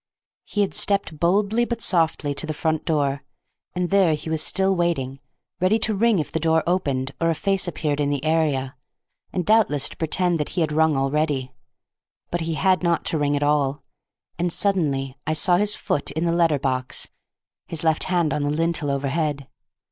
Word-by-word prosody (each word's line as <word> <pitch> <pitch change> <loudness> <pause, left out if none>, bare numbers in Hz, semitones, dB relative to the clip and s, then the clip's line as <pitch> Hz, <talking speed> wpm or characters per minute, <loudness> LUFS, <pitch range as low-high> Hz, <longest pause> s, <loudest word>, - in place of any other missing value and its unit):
He 205 - -1
had 200 - 0
stepped 200 -6 0
boldly 200 +6 +2
but 235 -1 -3
softly 160 -7 +1
to 155 - -4
the 155 - -3
front 160 0 -1
door, 140 -3 0 0.5
and 180 0 -1
there 190 -5 +4
he 160 +2 -7
was 160 -1 0
still 190 +4 +2
waiting, 140 -7 -1 0.4
ready 185 +5 +3
to 220 0 +1
ring 225 +1 +3
if 155 - -2
the 160 - -1
door 160 0 +2
opened 140 -7 -1
or 165 - +3
a 165 - +1
face 195 +2 0
appeared 150 -4 -2
in 145 -1 +1
the 145 0 -2
area, 150 -5 0 0.6
and 180 -2 -2
doubtless 210 -11 +3
to - - -13
pretend 175 +1 0
that 150 - -2
he - - +3
had 155 -2 0
rung 155 -1 +2
already. 135 -1 0 0.8
But 175 - -1
he 165 0 -2
had 185 +5 +2
not 170 -1 0
to 160 - -1
ring 145 0 +1
at 145 - 0
all; 145 -1 +1 0.6
and 175 0 0
suddenly 140 -9 0
I 155 - +1
saw 175 +3 +3
his 210 +2 0
foot 145 - -1
in 160 +2 -2
the 170 - +1
letter 165 -3 +3
box, 130 -2 -2 0.6
his 165 - -3
left 160 -1 +1
hand 175 -4 +1
on 150 - -1
the 145 - 0
lintel 165 0 0
overhead. 140 0 -1
160 Hz, 195 wpm, -23 LUFS, 145-180 Hz, 0.8 s, there